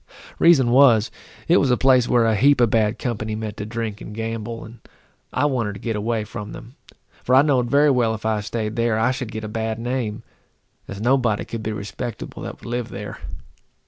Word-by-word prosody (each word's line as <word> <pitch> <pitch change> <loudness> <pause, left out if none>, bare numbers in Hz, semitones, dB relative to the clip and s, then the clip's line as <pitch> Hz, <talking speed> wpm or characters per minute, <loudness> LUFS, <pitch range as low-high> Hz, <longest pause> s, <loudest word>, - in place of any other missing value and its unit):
The - - +1
reason 135 -8 +6
was, 120 -5 +5 0.4
it 175 - +5
was 140 - +2
a 125 - +3
place 130 -2 +4
where 120 -2 +4
a 110 -1 +2
heap 140 +6 +4
of 120 -3 +3
bad 110 0 +2
company 110 -3 -3
met 110 -1 -5
to 105 - -5
drink 110 -2 -4
and 105 - -8
gamble, 115 0 -5
and 115 +2 -13 0.5
I 130 - +1
wanted 120 -7 0
to 100 - -9
get 115 +1 -3
away 110 +1 -1
from 105 -1 -7
them, 115 +2 -11 0.5
for 125 - +2
I 135 - +7
know'd 130 -5 +1
very 145 +1 +4
well 120 -4 +2
if 110 - -10
I 110 -1 +1
staid 110 +1 -3
there, 115 -1 +1
I 115 +3 +2
should 130 -3 -5
get 110 0 -6
a - - -4
bad 110 0 -3
name, 120 -2 -3 0.6
as 100 - -7
nobody 120 -2 +1
could 115 - -6
be 110 - -3
respectable 105 +3 -6
that - - -7
would - - -13
live 120 0 -3
there. 105 0 -7
115 Hz, 215 wpm, -22 LUFS, 110-125 Hz, 0.6 s, I